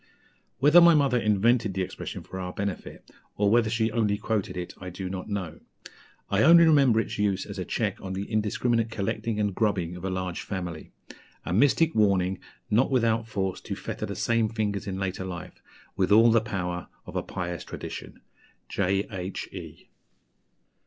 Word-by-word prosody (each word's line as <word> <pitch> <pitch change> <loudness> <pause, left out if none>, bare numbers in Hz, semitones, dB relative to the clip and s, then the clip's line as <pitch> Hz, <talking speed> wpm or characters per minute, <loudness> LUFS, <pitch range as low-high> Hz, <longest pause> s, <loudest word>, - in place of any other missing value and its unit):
Whether 150 +6 +7
my 170 -1 +7
mother 140 -4 +3
invented 110 0 +2
the 95 - 0
expression 95 - -6
for 95 - -8
our 90 -1 -4
benefit, 100 -2 -5 0.3
or 105 0 +3
whether 115 -1 +4
she 110 0 0
only 110 -3 +1
quoted 105 -3 -2
it, 90 -1 -5
I 90 - -6
do 90 +1 -6
not 95 +2 -6
know. 95 -6 -4 0.7
I 100 +1 +1
only 170 +5 +8
remember 140 -8 +5
its 110 - -3
use 100 -2 +1
as 100 -1 -7
a 90 - -3
check 105 0 -2
on 95 -1 -5
the 95 +1 -3
indiscriminate 110 +2 0
'collecting' 110 +1 -2
and 105 -2 0
'grubbing' 90 -5 0
of 90 - -9
a 95 - -1
large 95 -1 -3
family; 90 -5 -6 0.5
a - - -2
mystic 145 - +3
warning 95 -3 +2 0.3
not 115 +5 +3
without 115 -3 +1
force 95 -4 -2
to - - -5
fetter - - -5
the - - -5
same 115 -2 +1
fingers 105 -3 -2
in 95 -1 -3
later 95 -1 -3
life, 90 -2 -8 0.3
with 95 +1 0
all 115 +2 +7
the 115 -1 +4
power 90 -5 -4 0.2
of - - -10
a - - +1
pious 90 -2 -5
tradition." - - -8 0.5
J.H.E. 95 0 -3
100 Hz, 175 wpm, -27 LUFS, 95-115 Hz, 0.7 s, only